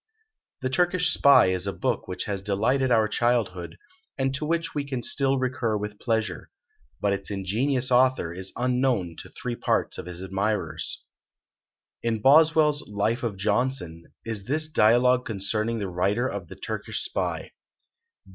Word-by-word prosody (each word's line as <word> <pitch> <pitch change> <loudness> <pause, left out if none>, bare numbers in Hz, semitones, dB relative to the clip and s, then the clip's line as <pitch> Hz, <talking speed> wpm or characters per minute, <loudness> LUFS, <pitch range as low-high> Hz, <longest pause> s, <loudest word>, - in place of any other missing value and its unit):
The 130 - 0
"Turkish 180 +3 +2
Spy" 140 -10 +6
is 95 +1 -2
a - - 0
book - - -2
which 90 - -4
has 100 -2 -3
delighted 115 +7 +1
our 110 -2 +4
childhood, 105 -8 -1 0.4
and 135 -1 0
to 140 +3 -3
which 165 0 -1
we 145 - -1
can 130 -4 -4
still 135 -1 +1
recur 125 -4 -1
with 105 0 -6
pleasure. 110 -2 -2 0.5
But 100 -1 +1
its 100 0 -4
ingenious 120 +7 -1
author 125 -9 +3
is 95 +2 -6
unknown 125 -8 0
to - - -9
three 125 -1 -5
parts - - 0
of - - -7
his 90 +1 -6
admirers. 100 +3 -2 1.0
In 115 -1 -1
Boswell's 150 +3 +5
"Life 105 +3 -1
of 115 -5 -3
Johnson" 100 -5 -1 0.2
is 110 -3 -4
this 155 +5 -1
dialogue 125 -2 +4
concerning 110 +2 -2
the 100 -3 -3
writer 95 +7 0
of 100 -7 -5
the - - -10
"Turkish - - -4
Spy." - - -3
115 Hz, 155 wpm, -26 LUFS, 100-130 Hz, 1.0 s, Spy